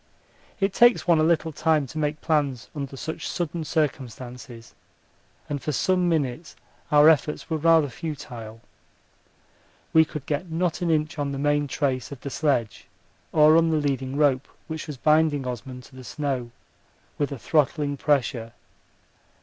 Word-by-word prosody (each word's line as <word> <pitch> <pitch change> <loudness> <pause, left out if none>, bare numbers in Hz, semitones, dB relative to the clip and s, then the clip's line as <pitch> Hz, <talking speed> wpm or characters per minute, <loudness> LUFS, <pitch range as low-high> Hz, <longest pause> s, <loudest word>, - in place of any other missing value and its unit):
It 195 -1 +1
takes 240 -4 +4
one 170 -2 +5
a - - +3
little 165 0 +2
time 155 -1 +1
to 155 +5 -7
make 150 0 -2
plans 145 -6 0
under 140 -2 -5
such 160 +4 -5
sudden 170 -1 -3
circumstances, 125 -5 -4 0.7
and 145 -2 -3
for 150 - -2
some 180 +5 +1
minutes 150 -1 -2 0.4
our 150 0 +7
efforts 155 +1 +2
were 160 - +1
rather 160 -1 +4
futile. 125 -7 -7 1.3
We 160 - +7
could 150 -3 -7
get 150 +5 -3
not 170 +1 -1
an 175 - 0
inch 155 0 0
on 140 -1 -1
the - - -4
main 145 +1 +1
trace 130 -2 -2
of 140 - -8
the 140 - -6
sledge 130 -8 -1 0.4
or 155 0 +6
on 165 0 +3
the 160 - +2
leading 135 -2 -1
rope, 140 -3 +2 0.2
which 160 0 -5
was 150 -3 -6
binding 150 -1 +2
Osman 125 +1 -6
to 130 - -17
the 130 - -10
snow 135 -3 -3 0.7
with 145 -1 0
a 140 - -4
throttling 145 +2 +1
pressure. 130 -5 0
145 Hz, 160 wpm, -25 LUFS, 130-160 Hz, 1.3 s, our